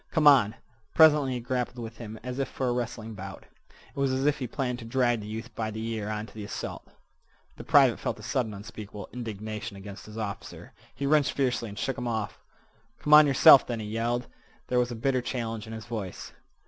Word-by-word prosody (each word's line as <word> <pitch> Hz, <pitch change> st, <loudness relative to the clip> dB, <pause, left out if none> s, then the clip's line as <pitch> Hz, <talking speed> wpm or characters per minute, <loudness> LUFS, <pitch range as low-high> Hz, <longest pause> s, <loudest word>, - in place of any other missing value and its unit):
"Come 155 Hz, -3 st, +1 dB
on!" 125 Hz, -7 st, +6 dB, 0.4 s
Presently 150 Hz, -5 st, +6 dB
he 125 Hz, -, -2 dB
grappled 125 Hz, +1 st, -2 dB
with 115 Hz, -1 st, -7 dB
him 110 Hz, -1 st, -8 dB
as 125 Hz, +1 st, -5 dB
if 135 Hz, -, 0 dB
for 130 Hz, -, -2 dB
a -, -, +2 dB
wrestling 120 Hz, -2 st, -4 dB
bout. 95 Hz, -1 st, -8 dB, 0.5 s
It -, -, -6 dB
was 135 Hz, -1 st, +2 dB
as 130 Hz, +1 st, 0 dB
if 150 Hz, 0 st, +2 dB
he 130 Hz, -, -3 dB
planned 125 Hz, -1 st, -2 dB
to 115 Hz, -, -9 dB
drag 120 Hz, 0 st, +1 dB
the 105 Hz, -, -8 dB
youth 115 Hz, +2 st, -6 dB
by 110 Hz, 0 st, -2 dB
the 110 Hz, +1 st, -5 dB
ear 110 Hz, -2 st, -3 dB
on 105 Hz, 0 st, -3 dB
to -, -, -16 dB
the 110 Hz, -, -7 dB
assault. 100 Hz, -, -6 dB, 0.7 s
The -, -, -8 dB
private -, -, +5 dB
felt -, -, -2 dB
a -, -, -11 dB
sudden 120 Hz, -4 st, -1 dB
unspeakable 105 Hz, 0 st, -9 dB
indignation 110 Hz, -2 st, -5 dB
against 100 Hz, +1 st, -10 dB
his 110 Hz, +1 st, -10 dB
officer. 105 Hz, -3 st, -6 dB, 0.2 s
He 140 Hz, -, -3 dB
wrenched 145 Hz, -1 st, +3 dB
fiercely 125 Hz, -4 st, 0 dB
and 100 Hz, -, -10 dB
shook 135 Hz, +4 st, -2 dB
him 125 Hz, -, -3 dB
off. 110 Hz, -3 st, -3 dB, 0.6 s
"Come 150 Hz, -, +1 dB
on 150 Hz, 0 st, +10 dB
yerself, 135 Hz, 0 st, +8 dB
then," 120 Hz, -2 st, -3 dB
he 110 Hz, -, -5 dB
yelled. 115 Hz, +3 st, -1 dB, 0.4 s
There 125 Hz, -, +3 dB
was 125 Hz, 0 st, +1 dB
a 120 Hz, -, -5 dB
bitter 130 Hz, +3 st, +1 dB
challenge 115 Hz, -4 st, -4 dB
in 110 Hz, -, -7 dB
his 110 Hz, -1 st, -7 dB
voice. 110 Hz, -6 st, -6 dB
115 Hz, 220 wpm, -28 LUFS, 110-130 Hz, 0.7 s, on